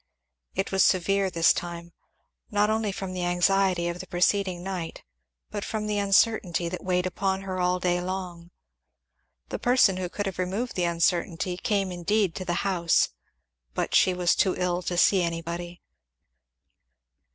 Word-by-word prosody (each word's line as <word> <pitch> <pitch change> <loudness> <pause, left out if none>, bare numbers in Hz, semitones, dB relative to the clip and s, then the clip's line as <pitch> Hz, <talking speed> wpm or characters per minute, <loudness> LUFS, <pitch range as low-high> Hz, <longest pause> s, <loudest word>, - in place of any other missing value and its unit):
It 195 - -1
was 195 -1 +4
severe 195 +1 +2
this 165 -2 +4
time, 170 0 -6 0.6
not 210 -1 +2
only 220 -1 0
from 195 -2 -5
the 180 -1 -3
anxiety 175 0 +2
of 175 +1 -4
the 185 - -8
preceding 185 0 +1
night 180 -4 -5 0.5
but 205 - -4
from 215 -1 -3
the 210 -1 -1
uncertainty 195 -3 +2
that 180 - -6
weighed 180 -1 0
upon 190 +1 -1
her 185 -1 -4
all 180 0 +1
day 180 -1 0
long. 180 -2 -5 1.0
The - - -4
person 245 -6 +4
who 185 -1 -3
could 205 +3 -4
have 190 -2 -4
removed 195 +7 -2
the 180 - +1
uncertainty 170 +1 0
came 195 0 -1
indeed 185 +1 0
to 185 - -6
the 175 +1 -1
house, 175 -4 +2 0.7
but - - -2
she 185 - +4
was 180 -1 +2
too 190 - +2
ill 180 -1 0
to 175 0 -3
see 190 +1 +4
anybody. 170 +1 -4
185 Hz, 160 wpm, -26 LUFS, 175-195 Hz, 1.0 s, was